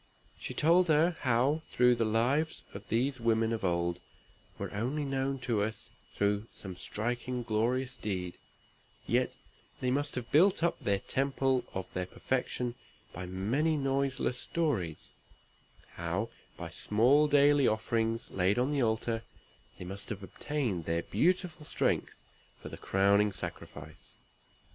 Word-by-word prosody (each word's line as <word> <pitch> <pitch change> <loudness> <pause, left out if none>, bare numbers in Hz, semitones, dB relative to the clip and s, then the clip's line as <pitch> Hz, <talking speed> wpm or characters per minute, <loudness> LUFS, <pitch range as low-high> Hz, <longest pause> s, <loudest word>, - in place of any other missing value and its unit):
She - - -5
told 175 +3 +4
her 160 +2 +4
how, 130 +5 +2 0.2
though 125 0 +6
the 115 -1 +1
lives 125 +9 +1
of 100 +1 -9
these 130 +4 +1
women 115 -1 +2
of 110 - -3
old 85 -1 0 0.6
were - - -5
only 130 +8 -1
known 135 0 -1
to 115 -4 0
us 110 +2 -4 0.2
through 105 +2 +1
some 95 -2 -8
striking 120 +6 -3
glorious 120 +4 0
deed, 90 -4 -4 0.7
they - - -3
yet - - +2 0.4
must 140 +3 0
have 125 -1 -5
built 175 +3 +5
up 170 - +1
the 100 -1 +1
temple 135 +3 0
of 95 -1 -2
their 90 0 -2
perfection 125 0 -2 0.4
by 90 +1 -6
many 120 - 0
noiseless 135 -2 0
stories; 115 - -1 0.8
how, 85 +6 -3 0.3
by - - -6
small 130 +8 +3
daily 145 -1 +5
offerings 115 +1 0
laid 95 +3 +2
on 125 +4 +1
the 145 -2 +1
altar, 115 0 0 0.6
they 90 - -7
must 95 +2 -6
have 100 -2 -5
obtained 110 - -2
their 85 +1 0
beautiful 175 - 0
strength - - 0 0.4
for - - -8
the - - -7
crowning 100 +2 +3
sacrifice. 95 - -8
120 Hz, 140 wpm, -31 LUFS, 100-140 Hz, 0.8 s, though